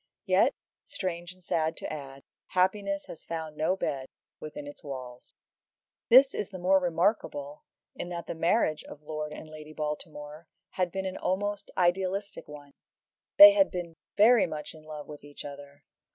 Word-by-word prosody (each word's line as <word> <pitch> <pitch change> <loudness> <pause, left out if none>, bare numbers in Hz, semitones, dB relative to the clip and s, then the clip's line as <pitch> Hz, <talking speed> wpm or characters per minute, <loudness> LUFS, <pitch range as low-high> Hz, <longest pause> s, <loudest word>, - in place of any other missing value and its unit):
Yet, - - +3 0.3
strange 180 -10 -4
and 185 0 -18
sad 160 -1 0
to - - -5
add, 135 -2 -8 0.2
happiness 200 +2 0
has 160 - -10
found 160 -2 -5
no 160 +5 +1
bed 135 -8 -3 0.3
within 150 -1 -7
its 145 - -10
walls. 130 -3 -8 0.7
This 265 +3 +8
is 205 - -3
the 190 - -8
more 185 +2 +4
remarkable 170 -5 -1 0.3
in 175 - -6
that 170 -1 -5
the - - -4
marriage 165 -1 +1
of 150 - -12
Lord 155 0 -4
and 155 - -9
Lady 155 0 -11
Baltimore 150 0 -6 0.2
had 180 -2 -1
been 190 +1 -3
an 190 0 -3
almost 205 +2 -2
idealistic 190 +3 0
one. 145 -1 -11 0.7
They 305 +1 +13
had 300 -1 +4
been 175 -2 -5 0.2
very 215 -2 +6
much 155 -2 -6
in 155 -1 -15
love 150 -1 -8
with 150 -2 -10
each 145 0 -10
other. 140 0 -10
165 Hz, 165 wpm, -29 LUFS, 150-190 Hz, 0.7 s, They